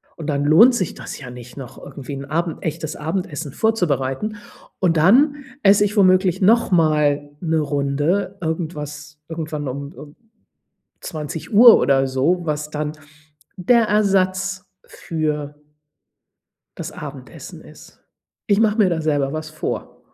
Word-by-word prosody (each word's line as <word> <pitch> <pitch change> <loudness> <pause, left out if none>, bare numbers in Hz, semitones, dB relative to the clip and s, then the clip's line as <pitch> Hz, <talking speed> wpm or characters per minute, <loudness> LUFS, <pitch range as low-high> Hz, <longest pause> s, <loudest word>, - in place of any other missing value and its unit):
und 160 - -8
dann 145 -2 -1
lohnt 185 - +6
sich 185 -9 -2
das - - -8
ja 125 -3 -9
nicht, 125 0 -11
noch 135 -4 -9
irgendwie 140 +1 -9
'n 135 0 -7
Abend 165 +3 -3
echtes 160 -1 -4
Abendessen 155 -2 -4
vorzubereiten. 180 - -1 0.4
Und 170 -3 +2
dann 260 - +5 0.3
esse 200 +1 +5
ich 205 - -3
womöglich 185 -2 +3
noch 225 +2 +4
mal 150 -4 +2
'ne 160 -2 0
Runde 145 +7 -1
irgendwas 150 -2 -5
irgendwann 155 -3 -4
um 140 +4 -6
um 150 -2 -13 0.9
20:00 195 - +4
oder 135 -1 +2
so, 135 +8 +1
was 150 -1 -3
dann 150 0 -3 0.7
der 230 +6 +4
Ersatz 195 -2 +1 0.2
für 150 -2 -4 1.2
das - - -6
Abendessen - - -10
ist. - - -16 0.5
Ich 205 0 +3
mache 220 -1 +2
mir 205 -4 +4
da 165 -2 -1
selber 145 -3 0
was 155 0 -5
vor. 155 - -5
160 Hz, 135 wpm, -20 LUFS, 145-190 Hz, 1.2 s, lohnt